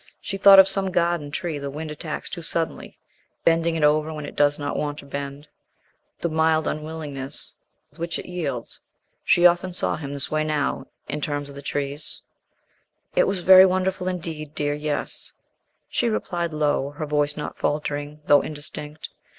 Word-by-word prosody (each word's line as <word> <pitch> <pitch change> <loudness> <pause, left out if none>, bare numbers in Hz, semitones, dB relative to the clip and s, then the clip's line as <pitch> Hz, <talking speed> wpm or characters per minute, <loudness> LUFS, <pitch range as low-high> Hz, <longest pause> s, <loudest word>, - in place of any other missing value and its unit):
She 195 - -4
thought 195 0 +9
of 190 0 +10
some 195 0 0
garden 170 -4 +1
tree 160 0 -3
the 140 0 -4
wind 155 +2 -6
attacks 155 0 -5
too 170 - -5
suddenly, 165 0 -2 0.5
bending 165 0 +3
it 160 - -1
over 150 +1 +3
when 150 -1 -5
it - - -8
does 145 0 +3
not 145 - -3
want 145 -1 -2
to 145 - -10
bend 140 +1 -6 0.7
the - - +1
mild 160 -1 +2
unwillingness 150 -3 -3 0.4
with 155 - -21
which 170 0 -2
it - - -7
yields. 145 -10 -4 0.4
She 175 - +4
often 175 +1 +4
saw 175 - -1
him 140 -3 -6
this 140 -1 -3
way 155 0 +1
now, 150 -2 -1 0.2
in 150 - -3
the - - -1
terms 145 -1 -3
of 140 0 -10
trees. 145 +1 -3 0.9
"It - - +4
was 195 -2 -1
very 190 +1 +9
wonderful 185 0 0
indeed, 160 -4 -4
dear, 145 0 0
yes," 150 0 -2 0.5
she 240 - 0
replied 175 -5 -2
low, 150 -2 +1
her 150 +2 -5
voice 150 0 0
not 150 - -5
faltering 145 0 -2
though 145 -1 +6
indistinct. 150 0 -6
155 Hz, 175 wpm, -24 LUFS, 145-170 Hz, 0.9 s, of